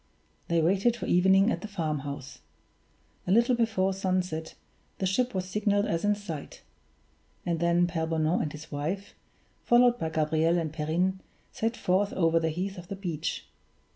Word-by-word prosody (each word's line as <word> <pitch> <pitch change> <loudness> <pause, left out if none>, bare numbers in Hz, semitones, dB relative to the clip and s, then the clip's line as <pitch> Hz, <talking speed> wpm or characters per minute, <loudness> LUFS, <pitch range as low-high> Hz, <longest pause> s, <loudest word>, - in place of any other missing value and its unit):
They 170 -1 +2
waited 195 +7 +3
for - - -5
evening 190 +4 +4
at - - -2
the 215 - -5
farmhouse. 145 -8 -4 0.9
A - - +1
little 235 +5 +4
before 220 -5 +1
sunset 185 -4 -2 0.4
the 190 - -1
ship 245 +6 0
was 185 -1 -1
signaled 205 +1 +1
as 165 -4 -1
in 205 0 +3
sight; 170 -8 -8 0.8
and 170 -2 0
then 170 +1 +3
Pere 165 -2 -2
Bonan 160 +1 +1
and 150 - -2
his 155 +1 -10
wife, 160 +8 -3 0.5
followed 240 0 +4
by 160 - -1
Gabriel 160 +2 +1
and 160 -3 -2
Perrine, 175 +5 0 0.3
set 225 +2 -2
forth 195 +3 +1
over 165 -2 +3
the 160 0 0
heath 185 +4 -4
to 175 - -18
the 195 - -5
beach. 170 -5 -4
180 Hz, 165 wpm, -28 LUFS, 160-200 Hz, 0.9 s, evening